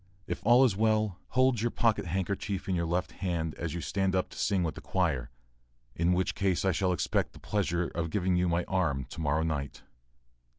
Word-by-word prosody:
If - - -4
all 120 +4 +6
is 110 -7 +2
well, 110 -2 +1
hold 130 -3 +2
your 120 - +1
pocket 115 -3 +1
handkerchief 95 +2 -2
in 95 - 0
your 85 -1 0
left 90 +2 -1
hand 85 -4 -2
as 80 -2 -4
you 85 - -3
stand 95 +4 0
up 95 - 0
to - - -12
sing 95 -3 +1
with 80 - -1
the - - -9
choir 65 -1 0 0.7
in 85 +2 +2
which 90 +1 +1
case 95 -2 0
I 95 - +4
shall 95 -1 +1
expect 90 - 0
the - - -13
pleasure 90 -4 -1
of 85 0 -3
giving 90 +1 +1
you 90 0 +2
my 85 +1 +1
arm 80 -9 0
to - - -6
morrow 75 +1 +1
night. 70 -4 -3
90 Hz, 210 wpm, -30 LUFS, 85-100 Hz, 0.7 s, all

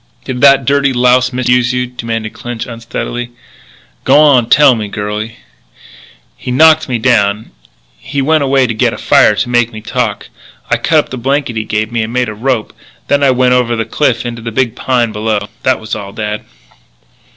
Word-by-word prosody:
"Did 125 -1 -4
that 140 -2 +5
dirty 140 0 +2
louse 125 +1 +3
misuse 125 0 +1
you?" 125 0 -1
demanded 115 -3 -5
Clinch 120 -2 -6
unsteadily. 120 +1 -5 0.7
"G'wan 140 -6 +4
tell 140 -2 +6
me, 110 -3 -4
girlie." 105 +2 -5 1.0
"He - - -8
knocked 155 +4 +4
me 125 - 0
down.... 110 -3 +1 0.5
He 140 - -5
went 155 +2 +2
away 135 -1 +2
to 115 - -2
get 110 - -1
fire 105 - +4
to 110 +4 -1
make 120 -1 +1
me 110 - -8
talk. 115 -1 -3 0.4
I - - +3
cut - - +1
up - - +1
the 130 - -6
blanket 135 +1 -1
they 110 -1 -3
gave 105 +1 -2
me 115 -1 -1
and 110 +1 -4
made 125 -1 -1
a - - -5
rope. 120 +1 -2 0.4
Then 145 0 +2
I 140 - +4
went 125 0 +2
over 125 -2 +1
the 115 -1 -2
cliff 120 0 0
into 120 -1 -5
the 115 0 -5
big 120 -1 -1
pine 120 -3 0
below. 105 -1 -2
That 130 -1 +1
was 110 0 -8
all, 100 -1 -5
dad." 105 -1 -4
120 Hz, 185 wpm, -13 LUFS, 110-130 Hz, 1.0 s, tell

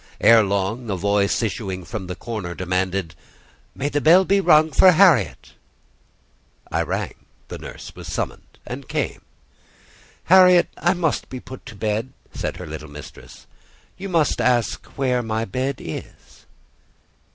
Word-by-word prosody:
Ere 115 -1 +7
long, 100 +4 -2
a 100 - 0
voice, 100 +4 +1
issuing 95 -4 -4
from 105 -3 -6
the 90 - -5
corner, 100 -5 -6
demanded—"May 90 - -4
the 145 0 -1
bell 175 +5 +6
be 195 +1 +3
rung 155 -3 +5
for 185 +5 +6
Harriet!" 160 - +3 1.2
I - - +1
rang; - - -3 0.4
the - - -7
nurse - - -10
was - - -10
summoned - - -5
and - - -8
came. - - -2 1.0
"Harriet, 180 -1 +6
I 175 +2 +1
must 165 -4 -1
be 130 - -6
put 130 +1 -11
to 110 - -10
bed," 110 +5 -2 0.2
said - - -4
her 90 - -7
little 75 -1 -8
mistress. 75 0 -12 0.5
"You 195 +1 -7
must 165 -4 +1
ask 120 -3 +1
where 125 -2 +1
my 110 -1 -2
bed 130 +7 -2
is." 80 - -10
115 Hz, 140 wpm, -22 LUFS, 95-150 Hz, 1.2 s, Ere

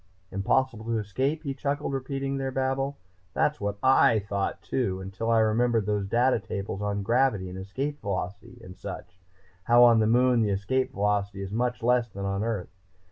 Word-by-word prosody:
"Impossible 115 +4 0
to 115 0 0
escape?" 130 +10 -1
He 140 -3 -2
chuckled, 140 +1 -2
repeating 135 +1 -3
their 135 -1 -2
babble. 135 +1 -1 0.4
"That's 150 - +1
what 100 0 -2
I 130 -3 +5
thought 100 -2 -3
too, 95 0 -1
until 95 +4 -4
I 115 -1 +4
remembered 115 0 +2
those 105 -1 -1
data 120 +4 +2
tables 100 -2 -5
on 100 -1 -2
gravity 115 -4 +1
and 95 - -7
Escape 135 +10 -4
Velocity 100 +5 -5
and 90 -3 -10
such 90 0 -9 0.5
how, 120 +1 +6
on 120 -2 +7
the 110 - +3
Moon, 125 +1 +4
the 105 - +1
Escape 130 +7 0
Velocity 100 -2 -1
is 95 - -6
much 120 +2 -1
less 120 0 +2
than 100 0 -6
on 100 +1 -1
Earth. 110 -6 -2
115 Hz, 180 wpm, -27 LUFS, 100-130 Hz, 0.5 s, on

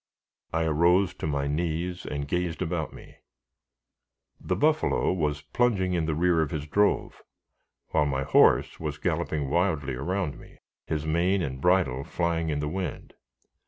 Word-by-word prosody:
I 80 0 0
arose 85 +4 +3
to - - -5
my 70 -2 -1
knees, 85 +4 -2
and 70 -1 -3
gazed 90 0 -1
about 80 -2 -2
me. - - -14 1.2
The - - -2
buffalo 155 -8 +2
was 75 -4 -1
plunging 95 +1 +1
in 85 -3 0
the 80 - 0
rear 85 0 +3
of 80 - 0
his 75 -1 -4
drove, 100 +7 +1 0.7
while 75 -2 +2
my 65 -1 -1
horse - - +4
was - - -4
galloping 75 -3 -1
wildly 80 -4 0
around 80 +5 -2
me, - - -16 0.3
his 80 -1 -2
mane 90 +4 +1
and 65 -2 -4
bridle 90 -8 +2
flying 85 0 -1
in 75 -1 -1
the 75 - -2
wind. 90 +4 -5
80 Hz, 155 wpm, -27 LUFS, 75-90 Hz, 1.2 s, horse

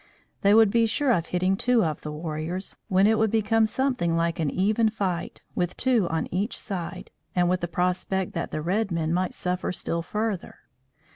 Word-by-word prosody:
They 200 +1 +5
would 220 -2 +6
be 230 0 +3
sure 275 +4 +1
of 170 -8 +1
hitting 185 +2 +1
two 240 0 +2
of 155 -2 -3
the 150 - -5
warriors, 160 +4 -4
when 190 +1 +4
it 220 +1 +4
would 220 0 +3
become 220 +1 +2
something 230 -10 0
like 170 0 0
an 155 -3 +1
even 215 +7 +2
fight, 190 -5 -3
with 180 0 -2
two 245 -8 +2
on 160 -1 -1
each 200 +5 -1
side, 180 -4 -5 0.2
and 175 -1 +3
with 180 +1 +1
the 175 - -1
prospect 180 +2 -1
that 170 - -3
the 155 - -4
red 200 +5 0
men 165 -1 0
might 185 +1 0
suffer 180 0 -2
still 170 -1 -2
further. 210 +2 -3
185 Hz, 195 wpm, -26 LUFS, 170-220 Hz, 0.2 s, would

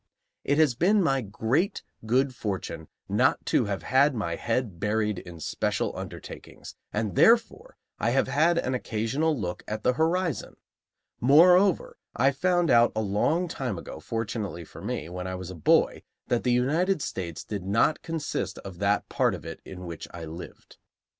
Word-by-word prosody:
It 145 - +1
has 155 -5 +4
been 190 - +3
my 135 -5 +2
great 120 - -1 0.2
good 130 +3 +2
fortune 95 -8 -4 0.2
not - - +2
to - - +2
have 100 -2 -3
had 135 +2 +3
my 85 -7 -2
head 115 -6 -2
buried 105 -1 0
in 85 -2 -11
special - - -2
undertakings, - - -9 0.2
and, 105 -4 -2
therefore, 240 - +3 0.2
I - - +1
have - - +2
had 165 +4 +3
an 130 -6 0
occasional 130 +6 -1
look 90 -3 -4
at 110 0 -4
the 125 - +3
horizon. 165 +2 0 0.6
Moreover, 180 +8 +5 0.2
I 135 +3 +4
found 175 +2 +1
out, 120 -1 +5
a 110 - 0
long 130 - +1
time 125 - -3
ago, 80 - -8
fortunately 105 -3 -4
for - - -12
me, 75 - -4
when 90 +1 -5
I 95 - -3
was 90 0 -7
a - - -8
boy, 80 - +3 0.3
that 120 -2 +2
the 125 - +2
United 155 +8 +1
States 85 -4 -5
did 100 -3 -5
not 115 +9 +2
consist 150 - -3
of 95 -3 -8
that 100 +1 +1
part - - +1
of - - -11
it - - -7
in 90 -1 -9
which 85 -2 -7
I 85 -1 -7
lived. 80 +3 -10
120 Hz, 170 wpm, -27 LUFS, 95-155 Hz, 0.6 s, Moreover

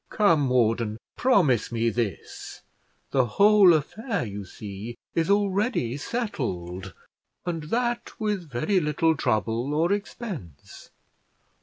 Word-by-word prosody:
Come, 165 -10 +3
warden, 115 -3 +1 0.2
promise 160 - +3
me 115 0 +1
this. 110 -5 -5 0.5
The 130 - +3
whole 205 -2 +7
affair, 190 - -1
you 100 -1 -6
see, 105 +4 -8 0.2
is 165 +1 0
already 200 - +1
settled, 115 - -4 0.5
and 165 -3 -3
that 240 +6 -2
with 205 -7 -2
very 165 - +1
little 160 +1 +1
trouble 120 +2 0
or 165 +4 +2
expense. 195 - -6
150 Hz, 110 wpm, -26 LUFS, -, 0.5 s, whole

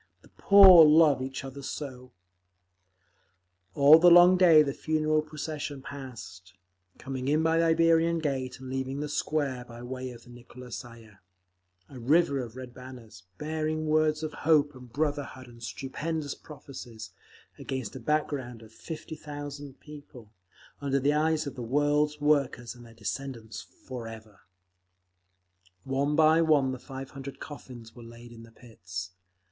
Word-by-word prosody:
The - - -20
poor 190 -4 +8
love 150 -3 +5
each 130 0 -5
other 135 +1 -8
so! 130 -3 -7 1.6
All 145 +3 +8
the 175 +1 +7
long 175 +1 +8
day 170 -4 +6
the 140 -2 -3
funeral 155 0 0
procession 150 -2 -6
passed, 115 -10 -10 0.4
coming 130 -1 -6
in 150 +3 +2
by 160 0 +2
the 165 - +3
Iberian 165 0 +3
Gate 135 -5 -3
and 130 - -10
leaving 130 +1 -4
the 150 - -3
Square 145 -4 -2
by 120 0 -11
way 130 +1 -6
of 120 -2 -12
the 120 - -16
Nikolskaya, 120 -3 -11 0.7
a 130 - -11
river 140 +3 +2
of 120 -2 -7
red 130 -1 -9
banners, 125 -6 -12 0.2
bearing 155 +2 -3
words 155 0 +1
of 155 -1 -4
hope 150 -1 +3
and 125 -2 -14
brotherhood 145 -2 -3
and 120 -1 -16
stupendous 145 +5 -4
prophecies, 130 -6 -11 0.5
against 130 -5 -5
a - - -6
back 150 +5 0
ground 125 -5 -7
of 110 - -16
fifty 160 +4 -8
thousand 145 -2 -9
people,—under 135 -1 -8
the 140 +2 +2
eyes 155 +1 +1
of 140 - -5
the 125 - -8
world's 145 +4 +1
workers 140 -5 0
and 120 -1 -15
their 115 - -17
descendants 115 -4 -6 0.2
forever…. 115 -5 -9 1.4
One 140 +2 -1
by 160 +1 +5
one 150 -5 +3
the 130 - -6
five 135 0 -9
hundred 135 0 -9
coffins 120 -6 -11
were 120 - -12
laid 120 +1 -13
in 115 -1 -12
the 115 0 -15
pits. 90 -6 -9
135 Hz, 150 wpm, -28 LUFS, 120-155 Hz, 1.6 s, poor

